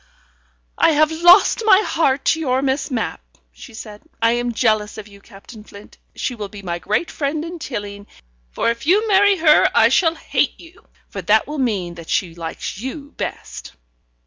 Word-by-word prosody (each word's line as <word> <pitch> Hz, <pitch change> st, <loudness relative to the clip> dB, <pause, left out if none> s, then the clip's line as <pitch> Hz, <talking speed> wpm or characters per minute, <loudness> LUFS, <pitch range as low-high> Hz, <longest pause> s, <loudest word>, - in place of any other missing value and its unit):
"I 325 Hz, -, +4 dB
have 310 Hz, +1 st, +3 dB
lost 345 Hz, +7 st, +5 dB
my 425 Hz, -1 st, +5 dB
heart 275 Hz, -4 st, 0 dB
to 320 Hz, -, +2 dB
your 265 Hz, -3 st, 0 dB
Miss 270 Hz, +2 st, -1 dB
Mapp," 235 Hz, -, -3 dB, 0.3 s
she -, -, -14 dB
said. 210 Hz, -1 st, -10 dB, 0.2 s
"I 230 Hz, 0 st, +3 dB
am 240 Hz, 0 st, -1 dB
jealous 215 Hz, -3 st, 0 dB
of 215 Hz, -1 st, -9 dB
you, 200 Hz, -1 st, -17 dB
Captain 210 Hz, +2 st, -14 dB
Flint. 205 Hz, -1 st, -15 dB, 0.2 s
She 255 Hz, -, -3 dB
will 210 Hz, -4 st, -7 dB
be 205 Hz, -1 st, -11 dB
my 175 Hz, -2 st, -4 dB
great 215 Hz, -, -2 dB
friend 300 Hz, +2 st, -3 dB
in 340 Hz, 0 st, -8 dB
Tilling, 205 Hz, -7 st, -7 dB, 0.5 s
and -, -, 0 dB
if 235 Hz, +4 st, -7 dB
you 415 Hz, +6 st, +3 dB
marry 405 Hz, -1 st, +4 dB
her, 310 Hz, -2 st, +4 dB
I -, -, +5 dB
shall 330 Hz, -3 st, +2 dB
hate -, -, -1 dB
you, 340 Hz, +2 st, -17 dB, 0.2 s
for -, -, -7 dB
that 220 Hz, +1 st, +2 dB
will 300 Hz, 0 st, -5 dB
mean 200 Hz, -9 st, -1 dB
that 170 Hz, -1 st, -12 dB
she 175 Hz, -4 st, -1 dB
likes 165 Hz, +3 st, -7 dB
you 280 Hz, +4 st, -7 dB
best." -, -, -7 dB
245 Hz, 185 wpm, -19 LUFS, 210-320 Hz, 0.5 s, lost